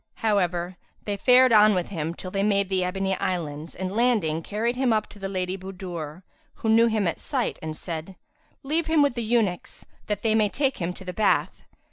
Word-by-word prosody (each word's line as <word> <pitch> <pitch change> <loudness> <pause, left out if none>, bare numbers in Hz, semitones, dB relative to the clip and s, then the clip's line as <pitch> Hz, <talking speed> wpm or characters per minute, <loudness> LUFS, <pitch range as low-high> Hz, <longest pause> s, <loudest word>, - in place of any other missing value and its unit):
However, 180 -4 0 0.3
they 205 - -1
fared 250 +4 +5
on 210 -1 +6
with 180 -1 -1
him, 165 -3 -3
till 185 - -8
they 195 - -1
made 200 -1 +1
the 190 -1 +1
Ebony 190 +1 -1
Islands 160 -3 -3
and 185 0 -4
landing, 215 -10 +2
carried 220 +7 -2
him 255 -1 +1
up 215 -1 +2
to 205 - -14
the 195 0 -4
Lady 185 0 -3
Budur, 180 -3 -7 0.3
who 220 - -3
knew 230 +1 +6
him 215 -4 +1
at 165 - -2
sight - - -2
and 155 -1 -5
said, 165 +2 -6 0.5
"Leave 315 +4 -1
him 320 -2 +4
with 285 - +2
the 240 - -3
eunuchs, 220 -6 -1 0.2
that 210 -1 -2
they 220 -1 +3
may 215 -2 +3
take 270 +3 -1
him 175 -1 -1
to 190 - -12
the 180 - -5
bath." 215 +3 +1
195 Hz, 205 wpm, -25 LUFS, 180-220 Hz, 0.5 s, on